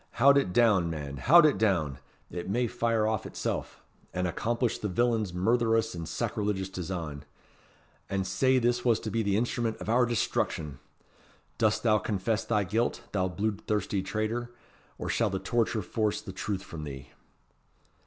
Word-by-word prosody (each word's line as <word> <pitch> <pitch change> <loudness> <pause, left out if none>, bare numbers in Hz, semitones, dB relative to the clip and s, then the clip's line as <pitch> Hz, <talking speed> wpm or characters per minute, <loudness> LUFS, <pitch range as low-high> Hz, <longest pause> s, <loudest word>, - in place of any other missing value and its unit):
Haud 140 +4 +6
it 95 - -2
down, 100 -6 +4
man! 75 -3 -5
haud 165 - +7
it 145 -10 +3
down! 80 -11 +1 0.3
it 90 +1 -5
may 120 +5 +1
fire 115 -2 0
off 110 -2 0
of - - -12
itsel', - - -2 0.5
and 90 0 0
accomplish 120 +6 -1
the 105 - -2
villain's 110 0 +1
murtherous 115 +4 +2
and 85 -2 -6
sacrilegious 100 -2 -2
design. 85 -6 -5 0.9
And 95 -1 -1
sae 130 +8 +2
this 120 0 +1
was 115 -3 +3
to - - -4
be 115 - +1
the 100 -2 +1
instrument 115 -1 -1
of - - -7
our 120 +1 +4
destruction! 80 - -1 0.8
Dost 110 -2 +2
thou 110 -2 +4
confess 105 +2 -1
thy 105 -3 +1
guilt, 110 +6 -1
thou 95 -2 +1
bluid 100 +3 -3
thirsty 105 -2 0
traitor, 110 +5 -2 0.5
or - - -5
shall 115 -2 +1
the 95 - -2
torture 115 0 0
force 105 +2 -1
the 95 - -8
truth 95 0 -3
from 80 -5 -8
thee?" 70 -2 -8
105 Hz, 165 wpm, -29 LUFS, 95-115 Hz, 0.9 s, haud